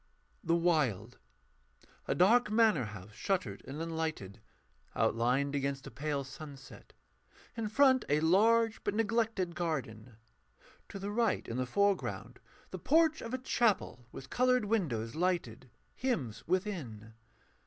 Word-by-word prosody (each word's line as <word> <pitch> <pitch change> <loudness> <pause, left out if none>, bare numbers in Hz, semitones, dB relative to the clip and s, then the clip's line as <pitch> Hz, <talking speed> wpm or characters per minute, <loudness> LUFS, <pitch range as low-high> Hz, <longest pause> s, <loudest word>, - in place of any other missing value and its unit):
THE 165 - +2
WILD 135 - 0 0.9
KNIGHT - - 0
_A - - -7
dark 210 +6 +5
manor 215 - +3
house 105 -1 -9
shuttered 125 - -2
and 140 +3 -6
unlighted, 160 - -4 0.5
outlined 125 +5 +1
against 140 -1 -2
a - - -8
pale 145 -1 -2
sunset: 140 0 -11 0.6
in 225 -2 -3
front 260 +2 +4
a 145 +1 +3
large, 220 +7 +3
but 205 - -1
neglected, 220 -5 0
garden. 130 -10 -4 0.7
To - - -7
the 200 +1 -4
right, 230 0 0
in 115 - -4
the 130 0 -1
foreground, 200 +6 -1 0.3
the - - -6
porch 320 +1 +3
of 230 - -6
a 255 - -1
chapel, 215 - 0
with 130 - -10
coloured 250 -2 +2
windows 140 - -1
lighted. 160 -9 -2 0.2
Hymns 135 - -3
within. 160 - -3
165 Hz, 130 wpm, -32 LUFS, -, 0.9 s, dark